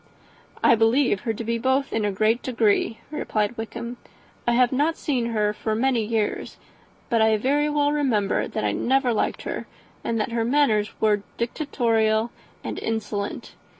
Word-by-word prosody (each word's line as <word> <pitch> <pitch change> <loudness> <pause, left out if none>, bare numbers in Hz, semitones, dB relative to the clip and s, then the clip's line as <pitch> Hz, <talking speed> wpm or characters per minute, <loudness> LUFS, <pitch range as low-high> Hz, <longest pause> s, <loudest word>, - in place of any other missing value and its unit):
"I - - +7
believe 225 0 +3
her 225 -2 -1
to 230 - -5
be 230 +1 -1
both 260 +3 +1
in 220 -2 0
a 205 - +1
great 215 +4 +2
degree," 225 -2 +1
replied 215 -7 -1
Wickham; 235 +2 -6 0.5
"I 240 - +4
have 245 0 +4
not 295 +5 +1
seen 250 -5 -1
her 210 -2 0
for 215 +1 -2
many 245 0 +1
years; 215 -1 -2 0.5
but 230 -1 +3
I 220 0 +4
very 285 +6 +1
well 290 -1 +2
remember 245 -9 +1
that - - -3
I 105 - +1
never 255 - +1
liked 215 - -1
her, - - -5 0.4
and 230 -1 -1
that 215 - -1
her 230 -1 0
manners 230 -5 +2
were 210 -2 +2 0.2
dictatorial 230 -4 +1 0.3
and - - -4
insolent. 210 -2 -3
230 Hz, 165 wpm, -24 LUFS, 215-260 Hz, 0.5 s, I